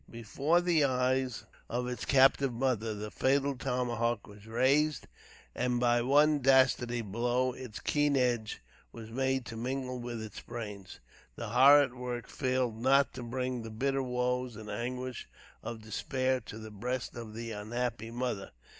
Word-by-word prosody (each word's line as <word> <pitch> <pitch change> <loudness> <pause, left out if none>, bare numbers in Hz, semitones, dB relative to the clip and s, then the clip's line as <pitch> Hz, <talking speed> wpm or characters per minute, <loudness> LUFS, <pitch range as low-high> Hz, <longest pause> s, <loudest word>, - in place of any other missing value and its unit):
Before 135 +9 +1
the 170 -4 +3
eyes 130 -2 0 0.2
of 125 +1 -2
its 125 -2 -4
captive 135 0 +4
mother 115 -3 -1
the 105 0 -6
fatal 140 +1 +1
tomahawk 120 -3 -1
was 105 +1 -14
raised, 140 +5 +2 0.5
and 125 -1 0
by 120 0 +3
one 145 +4 +4
dastard 130 -2 +4 0.2
blow 120 +3 +1
its 125 -4 -8
keen 145 -1 +1
edge 120 - 0 0.3
was 115 -1 -10
made 130 +1 0
to 115 - -7
mingle 125 +2 -3
with 120 -1 -5
its 110 -2 -7
brains. 105 -6 -8 0.4
The - - -5
horrid 135 +2 +6
work 125 -1 -5
failed 130 -4 -1
not 135 +2 +4
to 130 - -7
bring 125 +1 -3
the 115 - -7
bitter 135 +5 0
woes 125 -1 -1
and 105 0 -8
anguish 125 +3 -4 0.3
of 115 -2 -7
despair 130 +4 -1
to 110 - -7
the 110 -1 -9
breast 125 +5 -4
of 115 -2 -8
the 115 0 -5
unhappy 115 +1 -3
mother. 120 -4 -3
125 Hz, 155 wpm, -31 LUFS, 115-130 Hz, 0.5 s, horrid